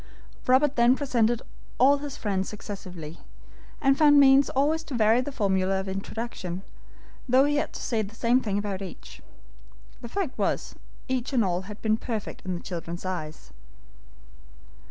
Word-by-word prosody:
Robert 265 +2 +4
then 240 +2 +5
presented 240 -5 +1 0.3
all 280 +3 +5
his 285 -1 -6
friends 195 -3 -1
successively, 185 -6 -8 0.6
and 275 -1 +3
found 295 -2 +7
means 275 0 +6
always 295 +4 +1
to 280 - -5
vary 225 +1 +4
the 290 - -5
formula 190 -5 +1
of 190 - -5
introduction, 190 -2 -5 0.7
though 260 +3 +5
he 290 0 +1
had 295 - -1
to - - -7
say 230 -3 0
the 210 +1 -7
same 240 +3 +2
thing 205 -4 -1
about 200 -2 -3
each. 65 - -9 0.8
The 235 - -7
fact 360 -2 -3
was, - - -1 0.3
each 260 0 -2
and 235 -5 +3
all 180 -1 0
had 210 - -10
been 220 0 +2
perfect 225 -3 -5
in 185 -1 -2
the 170 - -7
children's 170 0 -6
eyes. 155 -4 -5
225 Hz, 160 wpm, -26 LUFS, 190-265 Hz, 0.8 s, found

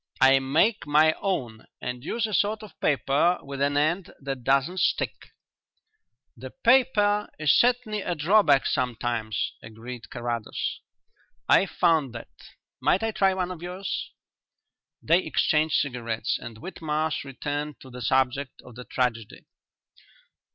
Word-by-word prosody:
I 135 0 +6
make 155 +10 +1
my 155 +2 +5
own 125 - -3
and 125 0 -5
use 225 +8 -1
a 215 - -5
sort 210 +3 +1
of 215 - -10
paper 145 +6 +2
with 140 0 -6
an 145 0 +1
end 165 +5 0
that 135 -2 -5
doesn't 140 +8 +1
stick." - - -1 1.0
"The - - -9
paper 210 - +3
is 155 -2 +3
certainly 240 -4 +2
a 175 -2 -2
drawback 155 -3 +4
sometimes," 120 -3 -1
agreed 115 +2 -9
Carrados. 120 -2 -3 0.7
"I've - - +4
found 155 -7 +2
that. 115 - -9 0.5
Might 195 - +2
I 225 - 0
try 195 -2 +2
one 185 -1 -2
of 175 -3 -8
yours?" 180 +2 -4 0.9
They 165 +3 +4
exchanged 155 0 +1
cigarettes 120 -5 -1
and 115 -2 -9
Whitmarsh 155 0 -3
returned 145 +2 -5
to 130 - -12
the 125 0 -9
subject 130 +2 0
of 125 - -12
the 125 +2 -10
tragedy. 120 -4 -2
145 Hz, 135 wpm, -26 LUFS, 125-185 Hz, 1.0 s, I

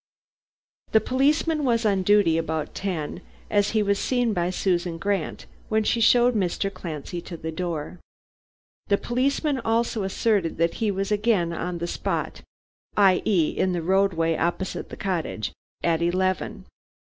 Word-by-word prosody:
"The 220 - +7
policeman 295 +6 +1
was 235 -3 +1
on 200 -3 +2
duty 200 -4 +4
about 160 -2 -3
ten, 175 -3 -3 0.3
as 205 -1 +3
he 215 - +3
was 200 0 +1
seen 245 -3 +1
by 175 -2 0
Susan 175 -2 0
Grant 195 -2 -2 0.2
when 220 0 +2
she 230 +2 +1
showed 240 +2 +5
Mr. 195 -1 -1
Clancy 165 +1 -6
to 170 0 -8
the 160 0 -5
door. 170 0 -4 0.9
The 200 - +3
policeman 270 +4 0
also 230 -1 0
asserted 195 -2 0
that 165 +1 +2
he 220 - +2
was 195 +1 -2
again 205 -5 +2
on 175 +1 -3
the 170 - -3
spot - - -3 0.6
i.e., 190 -3 +4
in 185 -1 0
the 170 -2 -2
roadway 175 -3 +2
opposite 175 +4 -2
the - - -8
cottage 170 - -2 0.3
at 165 -1 +2
eleven. 185 +2 -1
190 Hz, 150 wpm, -25 LUFS, 170-220 Hz, 0.9 s, The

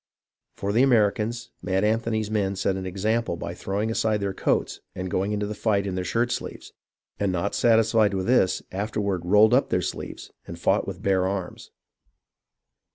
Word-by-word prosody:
For 100 +1 -2
the 115 - +4
Americans, 115 -1 +2
Mad 95 +1 0
Anthony's 110 0 0
men 100 -2 0
set 95 0 0
an 95 -1 -4
example 105 +2 -1
by - - -5
throwing 105 +3 -2
aside 110 -2 +1
their 100 -1 -2
coats - - -1 0.2
and 90 0 -4
going 95 +3 0
into 105 0 -1
the 105 - -4
fight 105 -2 0
in 95 - -3
their 90 0 -2
shirt 120 +5 0
sleeves, - - -6 0.5
and 100 -2 +1
not 85 -2 -1
satisfied 110 -3 +3
with 95 -1 -2
this, 95 -7 +2
afterward 100 -1 -2
rolled 105 +5 +5
up 130 - +3
their 90 - +1
sleeves - - -6 0.2
and 85 - -7
fought 85 - +1
with - - -7
bare 95 -1 +2
arms. 95 -2 -5
105 Hz, 175 wpm, -25 LUFS, 95-110 Hz, 0.5 s, rolled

